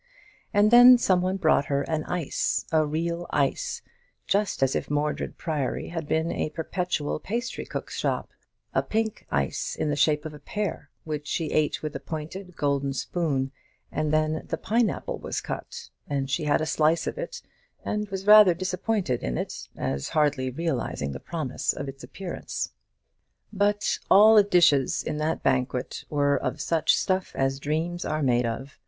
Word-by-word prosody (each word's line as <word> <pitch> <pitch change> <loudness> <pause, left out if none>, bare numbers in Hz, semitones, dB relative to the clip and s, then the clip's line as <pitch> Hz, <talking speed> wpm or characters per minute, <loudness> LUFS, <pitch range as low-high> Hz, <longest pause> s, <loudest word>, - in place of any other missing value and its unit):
And 210 +1 +4
then 245 +1 +10
some 185 -6 +2
one 185 +1 0
brought 155 -5 +3
her 140 0 0
an 155 -1 -2
ice, 175 -5 -1
a 160 -1 +4
real 170 +3 -2
ice, 150 - -1 0.4
just 200 -7 +1
as 135 - +2
if - - -2
Mordred 150 +1 -1
Priory 150 -6 -2
had 165 -3 -5
been 160 +2 0
a - - -2
perpetual 160 -1 -2
pastrycook's 235 - -4
shop, - - -2 0.4
a - - +3
pink 220 -1 -2
ice 70 -1 -1
in 150 - -1
the - - 0
shape 150 +2 +2
of 155 - -5
a 150 - -10
pear, 205 +7 -4
which 150 -3 -5
she 160 -3 -2
ate 155 0 +1
with 155 -1 -4
a - - -3
pointed 170 +5 -7
gold 140 -2 0
spoon; 140 -4 -1 0.4
and 155 -1 -1
then 155 0 +1
the - - -2
pine 225 +1 +2
apple - - -5
was - - -3
cut, 475 0 -7 0.2
and 135 -1 -2
she 150 +3 0
had 150 +1 +2
a - - 0
slice 155 +1 +2
of - - -4
it, - - -6 0.4
and 210 -1 -2
was 195 -1 -5
rather 210 -4 +8
disappointed 185 - -1
in - - -2
it, - - -5
as 70 0 -2
hardly 145 -4 +1
realizing 130 - -2
the 70 - -6
promise 155 -6 -2
of 140 - -5
its 135 0 -8
appearance. 190 -3 -5 0.8
But 205 0 +1
all 210 +3 +8
the 215 - +8
dishes 170 -9 +3
in 150 - -3
that 155 +1 -1
banquet 130 -1 -1
were 145 -1 +2
of - - -3
"such 160 -2 +2
stuff 185 0 -1
as 135 0 0
dreams 160 +4 -2
are 155 0 -1
made 120 -2 +2
of." 130 +5 -6
155 Hz, 170 wpm, -26 LUFS, 145-185 Hz, 0.8 s, then